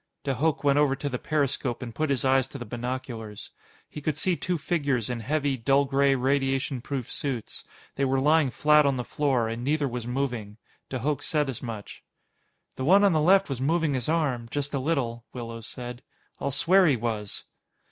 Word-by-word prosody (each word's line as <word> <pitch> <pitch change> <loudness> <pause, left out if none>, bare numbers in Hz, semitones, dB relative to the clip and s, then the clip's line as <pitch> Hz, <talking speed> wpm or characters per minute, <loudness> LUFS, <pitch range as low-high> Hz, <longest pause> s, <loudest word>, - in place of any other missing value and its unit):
De 135 - 0
Hooch 150 +2 0
went 140 0 +4
over 145 -2 +3
to 140 +2 -3
the 125 -2 -3
periscope 135 -4 -1
and 115 -2 -7
put 155 +4 -1
his 135 -2 0
eyes 130 0 +3
to 140 - -9
the 120 - -6
binoculars. 120 -2 -5 0.4
He 150 - -8
could 150 0 -1
see 180 +3 +1
two 180 +1 -2
figures 140 -7 -1
in 120 - -3
heavy, 140 +3 0
dull 135 +4 +3
gray 140 0 +3
radiation 135 0 0
proof 130 -2 -4
suits. 130 -6 -3 0.3
They 140 - 0
were 135 0 +1
lying 150 +1 +4
flat 150 +3 +4
on 135 -2 +1
the 125 - -2
floor, 130 -3 0
and 115 +2 -4
neither 145 +1 +1
was 120 -2 -5
moving. 120 -5 -3 0.3
De 130 - -2
Hooch 145 +4 -1
said 150 -3 0
as 130 - -5
much. 115 -5 -7 0.7
"The 130 - -3
one 190 +8 +6
on 200 -3 +5
the 155 - +2
left 195 +4 +5
was 135 -3 -4
moving 160 +1 +1
his 130 +1 -1
arm 140 -8 0
just 145 +2 -3
a 140 - 0
little," 130 -6 -1
Willows 115 -2 -7
said. 125 -1 -7 0.4
"I'll - - -1
swear 180 +7 +4
he 145 - +4
was." 110 -3 -3
135 Hz, 200 wpm, -27 LUFS, 120-150 Hz, 0.7 s, one